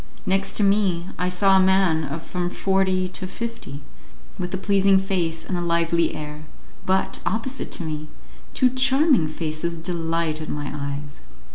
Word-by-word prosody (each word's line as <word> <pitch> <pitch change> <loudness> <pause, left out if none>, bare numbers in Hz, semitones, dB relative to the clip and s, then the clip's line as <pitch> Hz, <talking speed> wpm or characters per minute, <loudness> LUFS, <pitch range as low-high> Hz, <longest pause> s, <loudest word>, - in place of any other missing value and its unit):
Next 195 +1 +1
to 210 - +2
me, 195 -3 +2
I 180 - +1
saw 195 +2 +4
a - - +6
man 190 -4 +3
of 155 +3 -5
from 180 -1 -2
forty 190 -1 +1
to 185 0 -4
fifty, 230 -9 -6 0.6
with 180 -1 -3
a 190 - -1
pleasing 195 0 +4
face 180 -4 -1
and 185 - -2
a 175 - -1
lively 170 -1 +1
air, 150 0 -7 0.4
but, 190 +1 +1
opposite 250 +5 -3
to - - -2
me, 155 -1 -4 0.5
two 255 -2 +4
charming 265 - +3
faces 155 +2 -3
delighted 165 -2 -2
my 145 -1 -3
eyes. 140 0 -5
180 Hz, 155 wpm, -23 LUFS, 160-195 Hz, 0.6 s, a